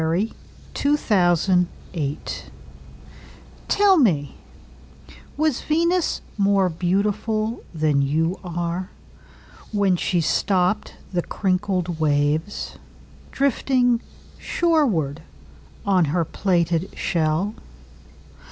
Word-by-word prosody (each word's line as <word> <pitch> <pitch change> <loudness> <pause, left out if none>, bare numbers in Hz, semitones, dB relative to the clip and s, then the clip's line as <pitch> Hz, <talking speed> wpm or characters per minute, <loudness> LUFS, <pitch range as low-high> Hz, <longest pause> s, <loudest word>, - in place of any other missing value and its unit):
Venus 170 +8 0 0.4
Transiens 185 - +2 0.3
By 175 - -5
Amy 145 0 -1
Lowell - - -8 1.2
TELL 400 -2 +4
me, 155 - +2 1.0
Was 310 -3 +1
Venus 335 +3 +1 0.2
more 195 -2 +3
beautifulThan 195 -4 0
you 160 +6 0
are, 175 +1 -3 0.8
When 200 -3 +2
she 180 +1 0
stoppedThe 180 +1 0
crinkled 185 -3 -1
waves, 150 +5 0 0.5
Drifting 250 -3 +2 0.4
shorewardOn 185 - -1
her 165 +3 0
plaited 170 0 0
shell? 165 +4 0
185 Hz, 75 wpm, -23 LUFS, 165-215 Hz, 1.2 s, TELL